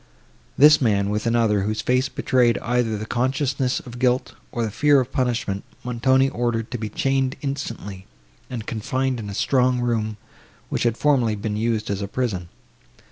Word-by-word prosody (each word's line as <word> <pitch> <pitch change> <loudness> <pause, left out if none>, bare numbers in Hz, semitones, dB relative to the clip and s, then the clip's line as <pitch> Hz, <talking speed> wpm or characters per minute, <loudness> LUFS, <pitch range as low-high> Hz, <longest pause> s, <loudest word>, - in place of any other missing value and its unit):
This 150 +1 +7
man, 100 -4 +2
with 105 +2 -1
another, 115 -3 +2
whose 105 +2 -1
face 125 +3 +1
betrayed 125 -4 +2
either 115 -2 0
the 105 - -5
consciousness 130 +2 0
of 125 -1 -10
guilt, 125 0 +1 0.2
or 120 - -2
the 110 - -2
fear 145 +5 +4
of 130 0 -2
punishment, 115 -6 -1 0.2
Montoni 130 +2 +2
ordered 120 -3 -2
to 125 - -3
be 110 -1 -4
chained 135 +4 0
instantly, 115 -9 -5 0.4
and 120 -4 -5
confined 125 +3 -2
in 105 -2 -6
a 100 - -6
strong 125 +1 +2
room, 110 -3 -1 0.5
which - - -1
had 115 - -7
formerly 125 -7 +2
been 105 +1 -3
used 110 0 -1
as 100 0 -2
a 100 - -3
prison. 100 -7 -3
120 Hz, 170 wpm, -23 LUFS, 110-130 Hz, 0.5 s, This